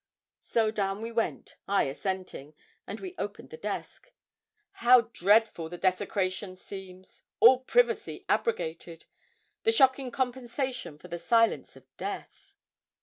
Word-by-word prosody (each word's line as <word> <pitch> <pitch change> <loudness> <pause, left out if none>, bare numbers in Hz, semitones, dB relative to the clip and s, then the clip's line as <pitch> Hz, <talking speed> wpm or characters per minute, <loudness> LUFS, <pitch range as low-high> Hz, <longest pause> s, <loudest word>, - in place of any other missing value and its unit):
So 220 -2 +1
down 200 0 -2
we 230 - -4
went 230 0 -2
I 200 0 +3
assenting 155 -1 -4 0.3
and - - -6
we 375 -1 -7
opened - - -6
the - - -7
desk. - - -6 0.7
How 245 +1 +8
dreadful 210 -5 +2
the 175 - -7
desecration 185 +1 -1
seems 185 -1 -11 0.2
all 250 +2 +8
privacy 485 - +1
abrogated 165 - -2 0.6
the 450 - +3
shocking 265 - +4
compensation 250 - -3
for 165 - -13
the 170 0 -5
silence 230 +4 +2
of - - -16
death! 395 0 -7
215 Hz, 125 wpm, -29 LUFS, 185-255 Hz, 0.7 s, How